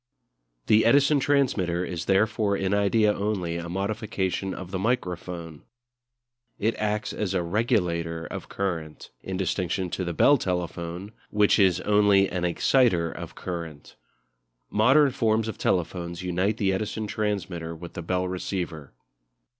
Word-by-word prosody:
The 110 +1 +5
Edison 140 +4 +4
transmitter 105 -12 +1
is 85 -2 -5
therefore 100 +1 +2
in 95 0 -1
idea 105 +1 +3
only 95 -5 -2
a 85 0 -5
modification 95 0 -2
of 95 -1 -7
the 95 - -2
microphone. 90 -7 -3 1.0
It 110 +3 +1
acts 105 0 -1
as 100 -3 -2
a 90 - +1
regulator 85 -5 0
of - - -7
current, 85 -6 -4
in 95 -1 -4
distinction 90 0 -1
to 95 - -2
the 85 - -2
Bell 145 - +5
telephone, 90 +1 -3 0.2
which 105 0 +3
is 95 -3 +4
only 105 -1 +4
an 90 -1 -2
exciter 90 -1 +2
of - - -8
current. 85 -5 -7 0.8
Modern 130 +7 +5
forms 110 -2 +1
of 110 - -5
telephones 85 0 -1
unite 90 +4 0
the 95 -3 +1
Edison 110 +2 -2
transmitter 95 -6 -3
with 85 +1 -10
the 90 - -5
Bell 90 +2 -1
receiver. 90 -6 -4
95 Hz, 140 wpm, -26 LUFS, 85-105 Hz, 1.0 s, The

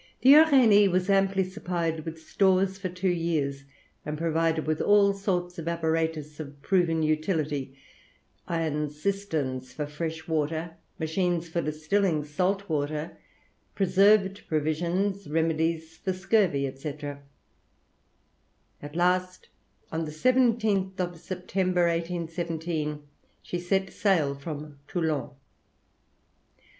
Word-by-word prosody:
The 265 +2 +8
Uranie, 260 -10 +7 0.2
amply 195 0 +3
supplied 170 -3 -3
with 165 0 -6
stores 190 +3 +2
for 190 -2 -3
two 180 +2 -3
years, 150 -5 -1 0.4
and 150 0 -4
provided 165 0 0
with 155 0 0
all 205 -1 +5
sorts 180 -3 -2
of 165 - -6
apparatus 160 -2 -1
of 145 -2 -8
proved 170 -4 +2
utility, 155 -4 -1 0.7
iron 155 -3 -1
cisterns 150 -7 -3
for 150 +2 -3
fresh 160 +2 -5
water, 160 +1 -2 0.2
machines 170 +1 -1
for 170 +1 -1
distilling 155 +2 0
salt 185 +7 -1
water, 150 +1 -3 0.6
preserved 195 +1 +4
provisions, 170 +6 -1
remedies 160 +1 0
for 190 - -2
scurvy, 185 -9 +1
&c. 140 +2 -5 1.9
At 145 +1 -9
last, 180 +1 0 0.4
on 160 0 -2
the 150 - -6
17th 215 -1 +2
of 175 -2 -3
September, 185 0 -1
1817, 165 -2 -2 0.4
she 175 - -4
set 190 +2 -1
sail 170 -9 +2
from 145 0 -7
Toulon. 160 -5 -1
165 Hz, 105 wpm, -27 LUFS, 155-190 Hz, 1.9 s, The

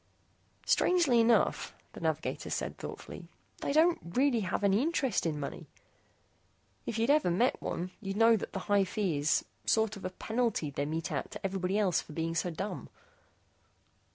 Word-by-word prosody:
"Strangely 335 -10 +4
enough," 230 0 +2 0.2
the - - -9
navigator - - -2
said - - -3
thoughtfully, - - -8 0.3
"they - - -2
don't 325 +4 +4
really 245 +8 +1
have 195 0 -2
any 200 +2 +4
interest 270 - 0
in 150 -2 -2
money. 140 - -6 1.2
If 225 - -2
you'd 230 +5 +3
ever 295 -9 +3
met 230 +9 +1
one, 180 +1 -3
you'd 195 -1 -4
know 225 +1 +6
that 215 - -4
the 195 - -3
high 205 -1 +3
fee 185 -5 -1
is 145 +2 +2 0.2
sort 220 -1 +2
of 200 - -10
a 185 - -2
penalty 220 -5 -1
they 140 +1 -2
mete 160 +1 -3
out - - -3
to - - -8
everyone 190 0 -1
else 195 -5 +2
for 155 - -12
being 165 +1 -2
so 170 +2 0
dumb." 190 +5 -5
200 Hz, 170 wpm, -31 LUFS, 175-235 Hz, 1.2 s, know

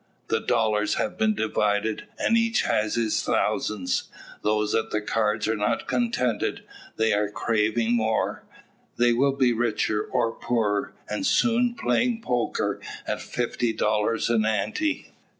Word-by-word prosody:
The - - +2
dollars 105 -1 +1
have - - -2
been 220 -1 +2
divided, 105 - 0
and 230 - +2
each 230 0 +2
has 105 0 0
his 115 -2 +1
thousands. 90 -4 0 0.4
Those 105 0 +1
at - - 0
the 105 - 0
cards 105 0 0
are 110 - +1
not 105 -1 -1
contented, 125 - 0 0.3
but 110 0 +2
are 105 0 +1
craving 110 +2 +1
more. 110 -1 0 0.5
They 120 0 +4
will 135 +3 +2
be 130 -3 +3
richer, 110 -2 0
or 120 -3 0
poorer. 110 -4 -1
And 290 - -3
soon; 245 -2 +2
playing 235 -2 0
"poker" 125 -1 -1 0.2
at - - -3
fifty 120 -1 -1
dollars 105 +1 +1
an 115 -2 +3
"ante." 110 - -1
110 Hz, 140 wpm, -25 LUFS, 105-125 Hz, 0.5 s, They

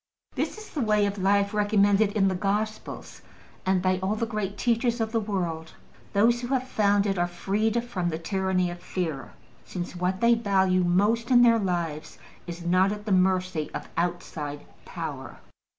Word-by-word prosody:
This - - -2
is 430 0 -11
the 295 - -3
way 210 -2 +3
of 200 0 -3
life 200 +1 +2
recommended 205 0 +3
in 195 -3 +3
the 190 - +1
Gospels, 210 +3 -3 0.5
and 190 -1 +2
by 185 0 +2
all 190 +3 -1
the 230 - -1
great 210 -3 -4
teachers 235 +1 +1
of 220 -1 -1
the 225 - +1
world. 175 -6 -3 0.4
Those 235 +4 +3
who 240 - -4
have 260 0 -1
found 205 -4 +2
it 195 -3 0
are 175 - +2
freed 210 +6 -1
from 185 -8 -2
the 160 - -3
tyranny 185 +1 0
of 175 0 -9
fear, 160 -7 -4 0.3
since 180 0 -6
what 180 +1 -1
they 235 +2 +5
value 190 -5 +2
most 205 +7 +2
in 245 -1 +6
their 230 -1 +5
lives 170 -5 -3 0.3
is 170 0 -7
not 185 +3 +3
at 210 0 -6
the 210 - -2
mercy 185 -3 +1
of - - -6
outside 160 -4 -3 0.2
power. 150 -7 -6
195 Hz, 180 wpm, -26 LUFS, 180-215 Hz, 0.5 s, in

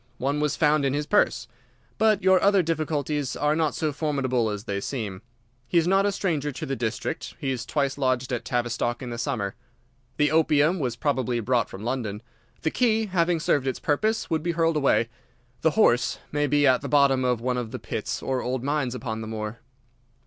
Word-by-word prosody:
One 140 +3 -1
was 150 -1 0
found 150 -1 +3
in 135 0 +1
his 150 0 -1
purse. 150 - +2 0.5
But 215 -2 +3
your 190 -1 +5
other 200 -2 +4
difficulties 150 -4 -1
are 150 +1 +1
not 160 -2 0
so 155 -1 -1
formidable 130 -6 0
as 105 -1 -4
they 100 -2 -3
seem. 105 -6 -4 0.5
He 175 - +1
is 165 0 +3
not 195 +2 +3
a - - +1
stranger 160 -7 -1
to 135 - -6
the 135 - -2
district. 115 +6 -3
He 135 -5 -2
has 125 -1 -4
twice 140 -2 -1
lodged 130 -1 0
at 120 - -2
Tavistock 120 0 -1
in 125 - -5
the 120 - -5
summer. 115 -7 -2 0.6
The 150 -1 +3
opium 155 +2 +3
was 125 -5 -1
probably 125 -3 0
brought 120 0 +1
from 95 - -9
London. 115 -3 -3 0.4
The 160 - +1
key, 225 -3 +2
having 175 -3 +1
served 140 -3 +1
its 130 - -2
purpose, 215 +9 0
would 160 -1 0
be 170 +1 -1
hurled 165 0 +1
away. 135 -5 +3 0.5
The 160 +5 +1
horse 125 - +3
may 145 0 +1
be 145 +1 +3
at 130 -2 +4
the 140 - -5
bottom 140 -2 +4
of 125 -2 +1
one 125 +1 -1
of 120 -3 -3
the - - -5
pits - - -4
or 130 -1 -1
old 125 0 -2
mines 140 -3 -1
upon 110 -3 -4
the 110 - -6
moor." 110 +1 -5
140 Hz, 205 wpm, -25 LUFS, 120-155 Hz, 0.6 s, your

